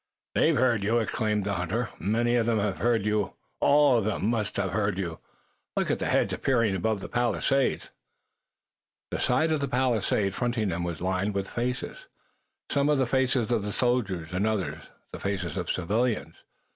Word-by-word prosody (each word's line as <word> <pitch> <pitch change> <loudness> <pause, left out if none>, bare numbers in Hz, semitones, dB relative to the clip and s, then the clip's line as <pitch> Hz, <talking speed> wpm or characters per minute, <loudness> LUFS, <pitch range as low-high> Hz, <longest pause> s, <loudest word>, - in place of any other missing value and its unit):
"They've - - +3
heard 120 -4 +2
you!" 110 +4 +2
exclaimed 110 -2 0
the 100 - -1
hunter. 100 +6 -1
"Many 120 +4 +1
of 115 -1 +2
them 115 -1 +2
have 100 -2 -1
heard 115 -4 +2
you! 105 -2 0 0.2
All 145 -4 +5
of 105 - -2
them 110 -2 -1
must 110 -3 -1
have 95 -2 0
heard 100 -1 0
you! 85 -4 -4 0.6
Look - - +1
at - - 0
the - - -1
heads - - +2
appearing 115 -6 +1
above 105 +2 -1
the - - -5
palisade!" 120 +3 +1 1.3
The - - -2
side 155 +6 +2
of 155 - +1
the 140 - 0
palisade 115 -6 +1
fronting 120 -3 -1
them 85 0 -2
was 85 -2 -4
lined 95 +2 -1
with 100 -1 -1
faces, 125 - -4 0.6
some 140 0 +2
the 145 -3 +3
faces 125 -2 +1
of 105 -3 -1
soldiers 100 -10 0
and 95 +4 +1
others 90 -8 -2 0.3
the - - -7
faces 95 -5 -3
of - - -3
civilians. 105 - 0
110 Hz, 175 wpm, -27 LUFS, 100-120 Hz, 1.3 s, All